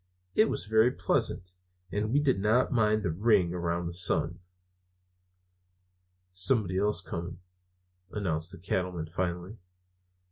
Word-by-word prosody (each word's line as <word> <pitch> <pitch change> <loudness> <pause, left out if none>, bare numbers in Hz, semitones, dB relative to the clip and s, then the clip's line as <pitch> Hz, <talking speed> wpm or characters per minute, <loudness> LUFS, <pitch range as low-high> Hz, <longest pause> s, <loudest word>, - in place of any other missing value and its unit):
It 215 - +5
was - - -1
very 110 +2 +4
pleasant, 90 -6 0 0.4
and 105 +2 -1
we 140 - +3
did 135 -8 +2
not 110 +5 +2
mind 110 -3 +2
the 85 - 0
ring 95 -1 +2
around 85 0 -2
the 85 - -4
sun. 90 +1 0 1.9
"Somebody 95 0 +1
else 105 -3 +2
coming," 85 -1 -6 0.7
announced 85 -5 -2
the 95 - -8
Cattleman 90 -2 -2
finally. 90 +4 -4
95 Hz, 120 wpm, -29 LUFS, 85-110 Hz, 1.9 s, It